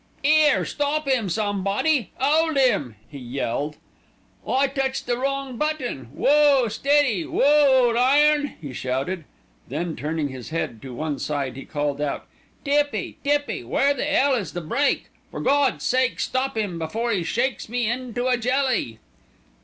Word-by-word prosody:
"'Ere, 305 -1 +4
stop 295 +1 -1
'im, 245 -7 +1
somebody! 205 - 0
'Old 310 +3 +2
'im!" 195 - +2
he 145 - -10
yelled. 135 +3 -3 0.7
"I 270 +2 +2
touched 270 -1 -2
the 240 - 0
wrong 275 -1 -2
button. 300 - -2
Whoa, 275 - +3
steady, 260 - +2
whoa, 275 -3 +4
ole 230 - -1
iron!" 290 +3 +3
he 145 -5 -8
shouted. 135 +8 -3 0.4
Then 160 +3 -3
turning 155 0 -2
his 130 -2 -8
head 155 -8 -3
to 130 -2 -8
one 150 0 -3
side 140 -4 -3
he 135 - -8
called 145 -1 -2
out: 145 -1 -3 0.4
"Tippy, 290 +1 0
Tippy, 290 - 0
where 275 - +2
the 285 +2 -2
'ell 285 -2 +3
is 230 -7 -2
the 175 - -4
brake? 275 - 0 0.2
For - - -7
Gawd's 285 -1 +1
sake 255 0 +1
stop 260 -2 -1
'im 195 -6 -2
before 225 +9 -2
'e 190 - 0
shakes 240 +6 -1
me 245 0 -1
into 245 0 -3
a 250 -1 +2
jelly!" 250 - 0
245 Hz, 155 wpm, -23 LUFS, -, 0.7 s, Ere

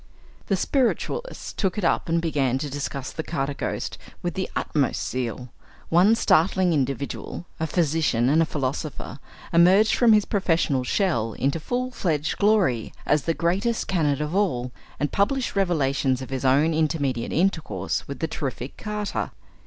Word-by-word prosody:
The 195 - +2
spiritualists 275 - -1
took 190 0 -1
it 210 - -2
up 170 - +1
and 165 +1 +2
began 140 -6 0
to 145 +1 -4
discuss 140 -1 -4
"the - - -4
Carter 145 -3 -2
Ghost" - - -4 0.2
with 175 -1 -1
the 190 - -3
utmost 145 -4 0
zeal. 125 0 -3 0.4
One 185 +7 +5
startling 185 -3 +3
individual 140 +3 -3
a 160 - 0
physician 150 -7 +1
and 155 +5 +4
a 165 - +2
philosopher 140 0 -4 0.3
emerged 185 +6 +6
from 235 -3 +5
his 210 -1 +4
professional 165 -9 +1
shell 125 - 0
into 140 +8 -1
full 250 +10 -2
fledged 155 - -1
glory, 200 - +2
as 150 -1 +2
the 165 - +1
greatest 195 +7 0
canard 150 -6 +1
of 150 +2 -3
all, 130 -12 0 0.3
and 150 - -1
published 250 +6 0
revelations 140 -8 +1
of 130 0 -8
his 130 -1 -3
own 145 +5 +4
intermediate 145 -6 0
intercourse 160 - -1
with 140 - -5
the 160 - -1
terrific 135 -4 -5
"Carter." 210 -1 -3
160 Hz, 155 wpm, -24 LUFS, 135-190 Hz, 0.4 s, emerged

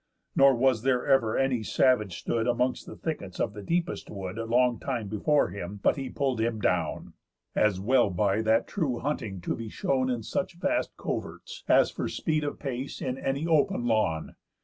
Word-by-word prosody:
Nor 135 -1 +6
was 125 -2 +2
there 125 0 +1
ever 135 -6 +3
any 135 -3 +1
savage 110 -4 +2
stood 115 0 -1
Amongst 125 +1 0
the - - -8
thickets 100 - -5
of 105 - 0
the 105 - -8
deepest 170 - -2
wood 95 -2 -6
Long 120 +1 +2
time 120 -6 -3
before 110 - +2
him, 100 +2 -6
but - - +4
he 135 -2 -4
pull'd 130 -3 -1
him 115 -1 0
down; 90 -5 -1 0.4
As 105 -3 +2
well 120 +2 +3
by 100 +3 +1
that 110 +1 +3
true 145 - -1
hunting 110 -10 -3
to - - -2
be 115 -1 -6
shown 130 +3 0
In 120 -3 -2
such 190 - -3
vast 250 - -1
coverts, 485 - -5
as - - +5
for - - -3
speed 155 -2 -1
of 145 - -3
pace 135 -1 -5
In 130 -1 -2
any 140 +3 -1
open 155 -7 +2
lawn. 100 -9 0
120 Hz, 185 wpm, -28 LUFS, 105-135 Hz, 0.4 s, Nor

